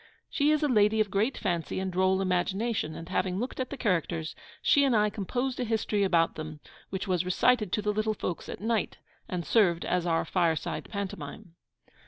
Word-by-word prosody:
She 285 0 +2
is 305 0 +2
a - - +4
lady 215 -3 +3
of 210 -3 +1
great 215 +7 +1
fancy 175 -4 -2
and 190 0 -2
droll 190 +1 +2
imagination, 190 0 0
and 165 - -8
having 185 0 -1
looked 245 +6 -4
at 255 - -2
the 285 - -6
characters, 170 - -1 0.3
she 285 - +4
and 265 -4 +3
I 210 -1 +3
composed 245 +6 -2
a - - +1
history 220 -2 0
about 170 -4 +3
them, 155 -1 -7 0.3
which 190 +1 -4
was 180 -2 +1
recited 210 +3 +2
to 210 - 0
the 210 0 +1
little 215 +1 0
folks 180 -3 -4
at - - -6
night, 225 -2 -1 0.3
and 175 -2 -3
served 175 -7 +3
as 180 -1 0
our 165 -1 +1
FIRESIDE 170 -4 -1
PANTOMIME. 180 -6 -6
195 Hz, 195 wpm, -29 LUFS, 175-220 Hz, 0.3 s, a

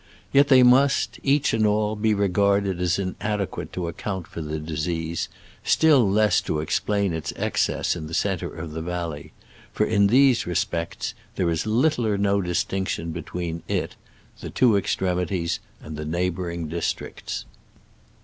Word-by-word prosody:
Yet 140 +1 +6
they 130 -2 +7
must, 130 +3 +4
each 140 -2 +2
and 110 -1 +2
all, 105 0 +2
be 110 0 +1
regarded 100 -1 +1
as 90 -1 +1
in 95 -2 -3
adequate 105 -2 -3
to 90 -2 -3
account 95 +1 -4
for 85 -1 -7
the 75 0 -3
disease, 80 +1 -3 0.3
still 140 -10 +4
less 105 -2 +3
to 75 - -2
explain 100 +4 0
its 80 -1 -3
excess - - 0
in 80 -3 -6
the 80 - -4
centre 95 -4 -1
of 80 -1 -7
the 80 +1 -5
valley; 85 -3 -4 0.4
for 105 - +1
in 100 -2 +3
these 130 0 +4
respects 85 -1 -2 0.2
there 85 -2 +1
is 80 +5 -1
little 120 +2 +2
or 105 -2 +1
no 100 0 +2
distinction 90 -1 -2
between 85 0 -5
it, - - -2 0.4
the - - -7
two 120 -4 +3
extremities 90 -3 0 0.2
and 75 - -8
the 75 - -5
neighboring 85 0 -2
districts. 85 +2 -4
95 Hz, 155 wpm, -24 LUFS, 85-105 Hz, 0.4 s, they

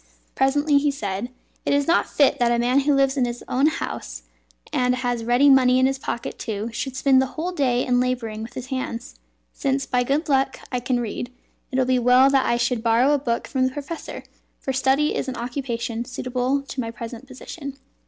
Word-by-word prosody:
Presently 285 +2 +3
he 290 +1 +1
said; 210 -4 -3 0.3
"It - - +1
is 285 0 +2
not 340 - +2
fit 285 -1 +3
that 240 -1 +3
a 240 - +2
man 245 +3 +3
who 285 +1 +2
lives 275 0 +2
in 255 - +3
his 240 0 -5
own 270 +4 +2
house, 115 - -4 0.5
and 250 0 +2
has 245 -2 -2
ready 245 +5 +4
money 255 -2 +6
in 260 - +4
his 270 0 0
pocket 235 - -5
too, 215 +1 -4
should 255 +3 -4
spend 265 0 +4
the 265 - 0
whole 345 +4 -2
day 255 -7 +1
in 245 -1 +2
labouring 240 -4 -2
with 230 +2 -8
his 255 - -5
hands. 255 -1 -5 0.3
Since 270 -1 -1
by 250 -2 +1
good 280 +6 0
luck 270 -2 +1
I 250 - 0
can 245 0 -1
read, 240 +2 -4 0.4
it 260 - -3
would 260 -1 +2
be 255 -1 +3
well 250 +3 +5
that 270 -1 +3
I 235 - +2
should 240 -1 0
borrow 235 +5 +3
a 290 - +2
book 235 -3 -2
from 260 -1 0
the - - -3
professor, 295 +4 -6 0.4
for 265 - -3
study 270 +3 +2
is - - -2
an 260 - -3
occupation 235 -1 -3
suitable 255 +2 -2
to 275 -1 -7
my 230 - -4
present 230 +2 -8
position." 275 +2 -8
255 Hz, 210 wpm, -23 LUFS, 240-275 Hz, 0.5 s, money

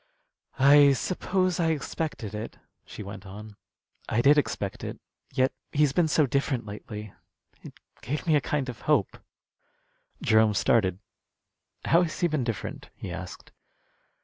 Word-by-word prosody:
"I 140 +1 +7
suppose 185 +5 0
I 165 - +2
expected 155 -7 -3
it," 105 +2 -6 0.3
she - - -8
went 100 0 -8
on. 105 +2 -10 0.5
"I 115 - +2
did 145 +2 +7
expect 105 -9 -1
it. - - -6 0.3
Yet 130 +1 +2 0.2
he's 145 -2 +2
been 170 +2 +3
so 155 -1 +3
different 135 -2 -1
lately, 105 0 -8 0.5
it - - -11 0.3
gave 145 +6 -3
me 160 -3 +3
a 145 - +3
kind 140 0 -1
of 120 -2 -7
hope." 145 - +1 1.0
Jerome 110 -1 +3
started. 95 -3 +2 0.9
"How 170 - +5
has 170 -3 -2
he 175 - +3
been 155 -5 -1
different?" 115 -5 -5
he 90 - -7
asked. 90 0 -8
130 Hz, 145 wpm, -27 LUFS, 105-150 Hz, 1.0 s, I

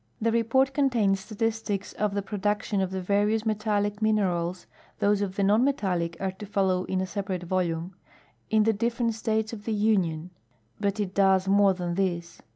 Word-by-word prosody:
The 230 +1 +1
report 235 +4 +2
contains 235 -9 +2
statistics 215 -1 -3
of 210 -1 -1
the 200 - -1
produc 205 +1 -1
tion 200 -2 -1
of 190 - 0
the 190 0 -4
various 210 +3 +1
metallic 210 -1 0
minerals 185 -5 0 0.3
(those 205 0 +2
of 195 -2 -2
the 200 - 0
non 210 +4 +4
metallic 180 -11 0
are 190 0 -1
to 195 +2 -10
follow 190 -2 +1
in 185 0 -1
a - - -1
separate 190 -2 -4
volume) 175 0 -1 0.6
in 220 -1 +4
the 220 +1 +3
different 230 +2 0
states 220 0 -1
of 210 -2 -8
the 225 - -1
Union; 185 -6 +1 0.5
hut 200 +1 0
it 195 -3 -2
does 190 -1 +3
more 200 -1 +4
than 175 -1 -3
this. 170 -2 -2
200 Hz, 180 wpm, -27 LUFS, 185-220 Hz, 0.6 s, non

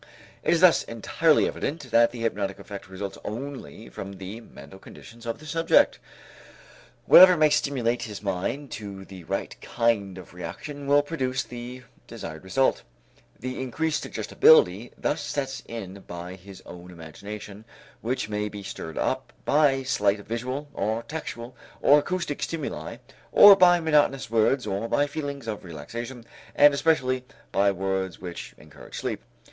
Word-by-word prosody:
It - - +1
is 165 - 0
thus 185 -2 +6
entirely 150 +7 +2
evident 145 -4 -4
that 115 0 +5
the 120 -1 -9
hypnotic 100 -3 -2
effect 100 -1 -9
results 95 +1 -6
only 125 -1 -7
from 100 0 -8
the 95 +4 -8
mental 75 -2 -13
conditions 115 +3 -13
of 115 - -2
the 155 - -14
subject. 165 +2 +3 1.1
Whatever 180 -1 +9
may 155 -1 +4
stimulate 125 -5 0
his 105 -2 -7
mind 100 +9 -3
to 100 -2 -7
the 95 -3 -11
right - - -3
kind 110 -5 0
of 90 -2 -12
reaction 140 +10 -7
will 145 +1 +5
produce 130 -4 -2
the 125 +1 -8 0.2
desired 80 +1 -8
result. 130 +8 +1 0.6
The 130 +1 -5
increased 155 +5 -1
suggestibility 110 - +4
thus 150 +1 -1
sets 140 -2 -3
in 100 -4 -7
by 85 +1 -7
his 95 0 -13
own 90 0 -11
imagination 100 +5 -9 0.4
which 125 +1 -2
may 105 0 -2
be 105 -1 -8
stirred 80 -4 -7
up - - -1
by 140 -3 +3
slight 105 -5 +1
visual 130 +5 -4
or 110 +1 -2
tactual 120 -4 -7 0.2
or 145 +1 +6
acoustic 170 -2 -3
stimuli 160 -4 -4 0.3
or 205 -1 +10
by 180 -2 +6
monotonous 150 -6 +2
words 115 +4 +2
or 100 +4 -2
by 145 - +2
feelings 140 -3 -5
of 110 -2 -4
relaxation 115 - -7 0.3
and 145 0 +7
especially 130 -4 +1 0.3
by 100 +1 +3
words 95 -1 -2
which 90 -1 -8
encourage - - -12
sleep. - - -3
115 Hz, 150 wpm, -26 LUFS, 100-145 Hz, 1.1 s, or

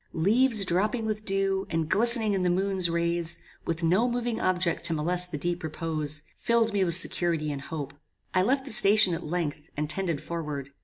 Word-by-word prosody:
Leaves 215 +5 +2
dropping 210 +6 -1
with 215 0 -4
dew, 195 0 -1
and 165 -1 -2
glistening 220 +3 +3
in 195 - -1
the 180 - +1
moon's 190 0 0
rays, 170 0 0 0.3
with 165 0 -2
no 190 +9 +2
moving 240 -1 -2
object 180 -2 0
to 170 -1 +3
molest 175 +3 +1
the 150 - -4
deep 175 +4 -3
repose, 155 -1 -2
filled 230 -2 0
me 200 -1 +1
with 170 -3 +1
security 170 -4 +1
and 140 -1 -6
hope. 140 -2 -7 0.4
I 185 - +3
left 265 +7 0
the 275 - -5
station 205 -3 +6
at 165 - -4
length, 155 -2 -4
and 150 +1 -2
tended 170 -2 -2
forward. 150 -3 -6
175 Hz, 190 wpm, -26 LUFS, 160-205 Hz, 0.4 s, station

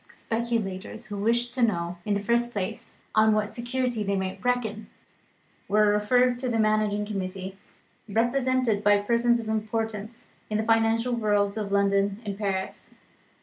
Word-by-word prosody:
Speculators 225 -2 -3
who 205 - -4
wished 235 +3 +1
to 255 - -2
know, 175 -6 +1
in 205 -1 +1
the - - 0
first 235 +3 +1
place, 190 -3 -5 0.2
on 220 0 +5
what 210 -1 -1
security 240 -1 -2
they 200 -1 0
might 190 -1 -3
reckon, 235 -4 -1 0.8
were 210 +1 +4
referred 245 +4 +3
to 255 0 -2
the 230 - 0
managing 215 -1 +1
committee, 190 -2 -5 0.5
represented 240 0 +1
by 205 0 +5
persons 235 +3 +2
of 225 - -6
importance 220 0 -3 0.2
in 215 - 0
the 215 - 0
financial 225 +2 +2
worlds 205 -3 +1
of 210 -2 -4
London 200 0 +2
and 200 -1 -3
Paris. 195 -2 -4
215 Hz, 150 wpm, -26 LUFS, 200-235 Hz, 0.8 s, on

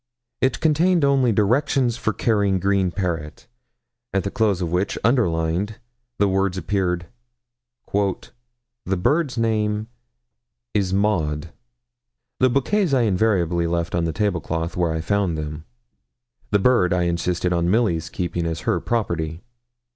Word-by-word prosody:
It 130 -1 +1
contained 165 +1 +3
only 135 -3 +3
'Directions 120 +3 +2
for 115 -2 -1
caring 100 -4 +1
green 95 0 +1
parrot,' 85 -5 -4 0.7
at 100 - 0
the 100 - -3
close 105 -5 +1
of 85 -3 -2
which, 90 +3 0
underlined, 100 -3 +1 0.4
the 100 - +3
words 95 -1 0
appeared 90 -3 -1 0.9
'The 120 +1 -4
bird's 145 - +1
name 110 -1 0 0.8
is 95 -3 +1
Maud.' 85 -6 0 0.9
The 130 - +4
bouquets 145 - +1
I 130 - +3
invariably 90 -5 +1
left 85 0 -2
on 85 -1 +1
the 80 - -1
table 100 -3 0
cloth, 80 +2 -3
where 85 -2 +1
I 80 0 -2
found 95 -1 0
them 75 +1 -5 0.8
the 105 - +3
bird 100 -4 +3
I 90 -1 +1
insisted 85 +1 0
on 85 0 +1
Milly's 95 -7 +1
keeping 85 -2 -2
as 80 -1 -3
her - - 0
property. 85 -7 -2
100 Hz, 135 wpm, -22 LUFS, 85-115 Hz, 0.9 s, The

